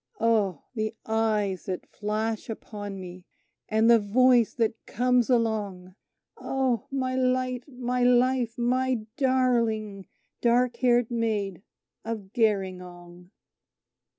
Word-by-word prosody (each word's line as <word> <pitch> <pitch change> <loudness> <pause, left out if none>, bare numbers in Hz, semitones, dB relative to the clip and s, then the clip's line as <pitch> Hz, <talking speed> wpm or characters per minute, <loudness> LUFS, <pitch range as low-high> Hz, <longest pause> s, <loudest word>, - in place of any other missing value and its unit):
Oh! 210 -8 +1
the 215 -1 -3
eyes 215 -4 0
that 185 -2 -4
flash 215 +2 -3
upon 205 -3 -7
me, 180 0 -9 0.5
and 220 +1 +3
the 235 -1 +7
voice 240 +3 +3
that 230 -1 +1
comes 250 0 +2
along 210 -6 -1 0.4
Oh! 260 -4 -1
my 260 -2 -2
light, 255 -1 0
my 250 -2 -3
life, 245 -1 +2
my 250 -1 0
darling 230 -7 0 0.3
dark 240 0 +2
haired 245 -2 +2
Maid 210 -6 -1 0.4
of 215 -4 -6
Gerringong..... 180 -5 -2
225 Hz, 105 wpm, -26 LUFS, 205-250 Hz, 0.5 s, the